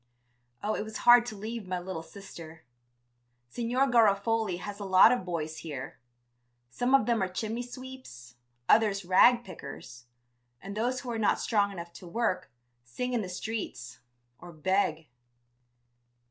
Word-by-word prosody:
Oh, 215 +1 0
it - - -2
was 220 +1 -6
hard 240 0 +8
to 220 - -5
leave 220 0 -6
my 185 0 -2
little 180 -2 -5
sister.... 165 -2 -12 0.9
Signor 240 - 0
Garofoli 220 -4 +2
has 205 +3 -7
a - - -5
lot 190 +3 +7
of 250 -5 0
boys 160 -3 -4
here, 145 -1 -7 0.7
some 245 - +2
of 270 - +4
them 235 -2 +1
are 190 - +1
chimney 220 +5 -3
sweeps, 245 - -10 0.3
others 205 -4 +3
rag 240 +7 +5
pickers, 125 - -10 0.5
and 200 +1 -8
those 245 +4 -1
who 250 - -5
are 225 - -3
not 215 - +2
strong 205 -3 +1
enough 170 -2 -8
to 180 - -11
work, 225 +1 -1 0.3
sing 250 - -4
in 240 - +1
the 185 - -5
streets 180 - -5 0.4
or 175 0 -11
beg. 165 -1 0
200 Hz, 150 wpm, -29 LUFS, 175-235 Hz, 0.9 s, hard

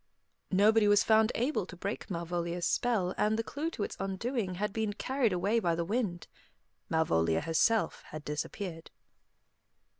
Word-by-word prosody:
Nobody 210 +3 +4
was 205 +1 +5
found 220 +1 +4
able 235 -6 0
to 185 - -9
break 200 +5 -5
Malvolia's 170 0 -2
spell, 205 -7 +1
and 215 +1 +2
the 225 - 0
clue 295 +8 -3
to 225 - -4
its - - -4
undoing 195 +1 -2
had 210 +2 -2
been 220 -2 -1
carried 260 +1 0
away 200 +6 +1
by 170 -6 +1
the 170 0 -2
wind. 200 -4 -2 0.6
Malvolia 80 - +2
herself 215 +7 +1
had 155 0 -8
disappeared. 165 +3 -5
200 Hz, 150 wpm, -31 LUFS, 175-220 Hz, 0.6 s, was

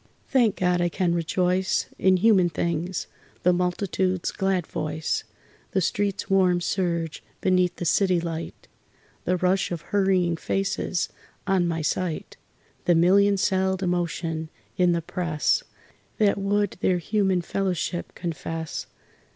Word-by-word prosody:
Thank 240 -6 +3
God 180 -1 +1
I 175 - +2
can 175 -1 0
rejoice 180 +2 +1
In 190 -1 +4
human 190 -3 +4
things 170 +2 -2 0.4
the 180 - +5
multitude's 180 0 0
glad 190 -3 0
voice, 155 +1 -2 0.5
The 190 - +2
street's 200 +2 -1
warm 185 -3 +3
surge 170 -3 -1 0.2
beneath 180 -1 +2
the 175 - -5
city 185 +1 +3
light, 165 -1 -6 0.6
The 180 +1 +2
rush 185 +1 +1
of 170 -3 -3
hurrying 185 -4 +2
faces 195 -1 -1 0.4
on 190 -3 +2
my 165 -2 -2
sight, 170 0 -2 0.5
The 175 - +4
million 200 +4 +5
celled 190 0 +1
emotion 165 -2 -1 0.3
in 180 +3 +3
the 170 -1 -1
press 170 -3 0 0.6
That 205 -2 +3
would 205 0 0
their 180 0 +2
human 190 0 +1
fellowship 180 -2 -2
confess. 165 -2 -4
180 Hz, 125 wpm, -25 LUFS, 170-190 Hz, 0.6 s, the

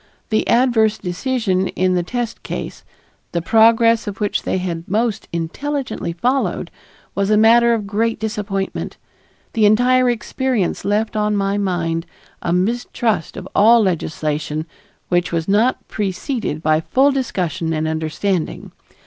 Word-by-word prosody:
The 215 - +1
adverse 230 -3 +3
decision 190 0 -1
in 185 0 0
the 180 - +2
test 240 +5 -4
case, - - -6 0.5
the 170 - +1
progress 225 +2 +4
of 200 -1 -5
which 205 -1 0
they - - -1
had 175 -2 -4
most 220 +1 0
intelligently 260 - -3
followed, 250 +10 -1 0.4
was 200 0 0
a 215 - +4
matter 235 +2 +5
of 215 -3 -4
great 220 +3 -1
disappointment. 205 -3 -3 0.6
The 215 -2 +4
entire 250 +4 +4
experience 240 -3 -1
left 215 +2 0
on 210 0 +1
my 200 +1 0
mind 170 -4 -1 0.3
a 170 - -2
mistrust 220 0 -1
of 190 - -7
all 225 +2 +6
legislation 155 -3 -2 0.4
which 175 0 +1
was 165 -1 -1
not 215 +6 +1
preceded 205 - -3
by 155 0 +3
full 270 - +3
discussion 180 - -2
and 155 0 -1
understanding. 160 +3 -2
205 Hz, 135 wpm, -19 LUFS, 175-230 Hz, 0.6 s, all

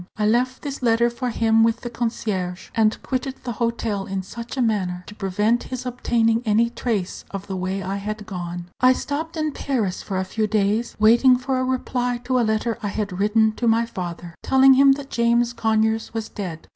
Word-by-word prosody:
I 210 - +1
left 245 +4 +1
this 280 -2 -5
letter 235 0 +3
for 250 +1 -3
him 225 -1 +3
with 230 0 +2
the 240 - -5
concierge, 205 -6 -3
and 220 -1 +2
quitted 260 +1 -2
the 245 - -3
hotel 230 -3 -2
in 195 -1 -3
such 235 +7 -8
a - - -1
manner 185 -5 -1
as - - -11
to - - -9
prevent 210 +4 0
his 255 0 -5
obtaining 230 -2 +1
any 230 +1 +2
trace 215 -7 -3
of 195 0 -6
the 195 - -5
way 190 +1 -2
I 195 +2 -3
had 210 +1 -5
gone. 175 -3 -6
I 255 0 +6
stopped 315 +5 -4
in 310 -1 0
Paris 230 -10 -2
for 195 - -4
a 190 - 0
few 215 +3 -1
days, 215 +2 0
waiting 240 +4 +6
for 260 +1 -1
a - - 0
reply 250 -1 -1
to 255 0 +1
a - - +3
letter 220 +1 0
I 210 - -2
had 200 -3 -3
written 220 +2 +3
to 240 - 0
my 230 +1 +3
father, 175 -5 -6
telling 265 0 +6
him 275 +1 +6
that 280 0 -8
James 235 0 +2
Conyers 220 -1 0
was 220 -1 -3
dead. 180 -6 -6
225 Hz, 210 wpm, -22 LUFS, 200-245 Hz, -, I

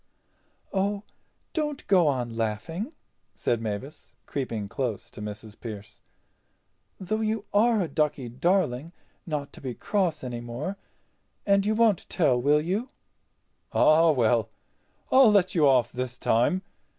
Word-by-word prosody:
"Oh, 200 +1 0 0.5
don't 295 -3 -2
go 180 -5 +4
on 125 -5 -1
laughing," 115 - -3 0.4
said 115 -1 0
Mavis, 110 +7 -6
creeping 115 -7 -3
close 120 -1 -3
to - - -10
Mrs. 105 0 -8
Pearce, 105 -2 -9 1.0
"though 215 +4 -2
you 220 -1 -1
are 225 +2 +4
a 175 - -1
ducky 150 -5 -1
darling 155 +2 0 0.3
not 150 -3 -3
to - - -12
be 130 -3 -5
cross 180 -8 -1
any 120 -2 -4
more. 120 +11 -4 0.7
And 200 0 +3
you 215 - +2
won't 220 -5 +2
tell, 135 -9 +2
will 145 +3 +4
you?" 200 - -2 0.8
"Ah, 160 +2 +5
well—I'll 120 - +2
let 190 -3 +3
you 155 -5 +4
off 125 -3 +4
this 125 0 -4
time. 125 - +2
150 Hz, 130 wpm, -27 LUFS, 120-195 Hz, 1.0 s, Ah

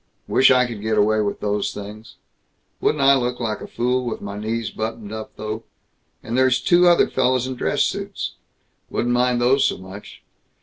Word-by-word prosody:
Wish 130 - +5
I 125 -1 +5
could 115 -4 -7
get 110 0 -1
away 110 +1 +3
with 100 -1 -3
those 105 0 -1
things. 105 +2 -9 0.6
Wouldn't 145 -2 +1
I 135 0 +7
look 125 -1 -1
like 110 -3 -3
a - - -7
fool 125 +1 -1
with 120 -2 -4
my 100 0 -7
knees 110 0 -3
buttoned 110 -1 -5
up, 110 0 -7
though! 110 +1 -5 0.6
And 115 - -4
there's 130 0 +3
two 175 +6 +4
other 175 -1 +5
fellows 130 0 +1
in 130 - -4
dress - - 0
suits. - - -3 0.6
Wouldn't 120 +1 -1
mind 125 0 +2
those 130 +3 +3
so - - +1
much. 95 +2 -11
115 Hz, 185 wpm, -22 LUFS, 105-125 Hz, 0.6 s, I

